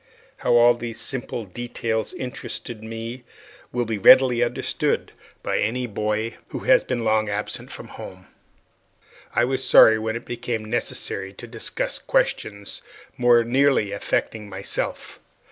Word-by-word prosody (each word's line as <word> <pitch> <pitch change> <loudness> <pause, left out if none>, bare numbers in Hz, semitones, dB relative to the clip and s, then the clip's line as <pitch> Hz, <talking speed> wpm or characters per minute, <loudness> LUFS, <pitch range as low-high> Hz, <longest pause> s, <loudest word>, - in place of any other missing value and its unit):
How - - +2
all 120 0 +7
these 115 -1 -6
simple 120 -2 -4
details 110 +1 -3
interested 120 -3 -5
me 115 +3 -6 0.5
will 120 0 -1
be 110 -2 -3
readily 125 +2 +7
understood 120 - -1 0.3
by - - 0
any 125 +3 0
boy 105 0 -2
who - - -6
has - - +4
been 120 -2 -2
long 110 -1 +2
absent 105 +1 -3
from - - -8
home. 95 0 -10 1.1
I 120 - +4
was 130 +1 -1
sorry 110 0 +7
when 110 +1 -2
it 115 - -6
became 120 -2 -4
necessary 95 -3 -2
to 110 - -10
discuss 115 -1 -3
questions 100 -1 -1 0.3
more 120 -1 +5
nearly 130 -3 +2
affecting 105 +1 -2
myself. 95 0 -4
115 Hz, 135 wpm, -23 LUFS, 110-120 Hz, 1.1 s, all